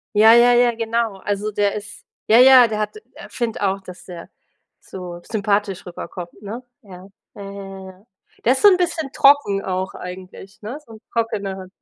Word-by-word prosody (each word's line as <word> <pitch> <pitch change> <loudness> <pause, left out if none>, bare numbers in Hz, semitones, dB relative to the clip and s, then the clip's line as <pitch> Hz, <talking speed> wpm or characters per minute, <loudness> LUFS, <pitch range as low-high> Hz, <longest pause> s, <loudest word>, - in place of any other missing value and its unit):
Ja, 220 +2 +7
ja, 240 +1 +6
ja, 240 -1 +3
genau, 230 -2 -2
also 205 +2 -3
der 205 0 0
ist 205 0 -9 0.2
ja, 225 - +5
ja, 255 -2 +8
der 215 -1 -4
hat 215 - -3 0.2
äh, - - -12
finde 235 -4 -4
auch, 195 0 0
dass 180 -1 -12
der 175 -2 -10 0.5
so 175 -2 -9
sympathisch 205 -3 -2
rüberkommt, 175 0 -8
ne? 225 +5 -7 0.2
Ja, 190 -2 -13 0.3
ja, 205 - -11
ja, 195 - -8
ja, 195 -1 -9
ja. 190 +4 -23 0.4
Der 245 - +3
ist 265 - -4
so 415 - +7
'n 370 - +5
bisschen 340 -5 -2
trocken 275 -9 +3
auch 185 0 -3
eigentlich, 185 +2 -10
ne, 230 +7 -6
so 225 - -14
'n 215 - -13
trockener. 200 -5 -3
205 Hz, 190 wpm, -20 LUFS, 190-235 Hz, 0.5 s, ja